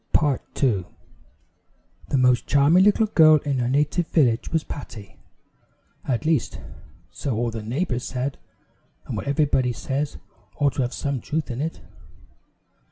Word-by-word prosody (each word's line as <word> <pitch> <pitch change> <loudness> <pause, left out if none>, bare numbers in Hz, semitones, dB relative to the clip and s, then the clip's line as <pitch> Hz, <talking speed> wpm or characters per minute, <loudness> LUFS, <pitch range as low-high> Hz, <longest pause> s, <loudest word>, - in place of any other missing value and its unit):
The - - +7
Wonderful 145 -4 -1
Pitcher 105 -10 +1 1.2
The 140 - +1
most 125 -1 +3
charming 145 +6 +5
little 210 +2 +4
girl 160 -7 +6
in 140 -3 0
her 120 0 0
native 150 +5 +1
village, 125 -8 +1
was 160 -2 +1
Patty; 110 -8 -9 0.9
at 130 +2 -1
least, 155 -5 0 0.5
so 115 +8 -3
all 120 +1 -1
the 110 -1 -5
neighbors 125 +3 -2
said, 130 +2 -3 0.7
and - - -5
what - - -5
everybody 140 -3 +1
says 135 +7 -3 0.4
ought 145 -2 +1
to 135 - -1
have 125 0 -2
some 140 -4 -2
truth 155 -3 -3
in 120 +3 -4
it. 160 +2 -4
140 Hz, 150 wpm, -23 LUFS, 120-150 Hz, 1.2 s, The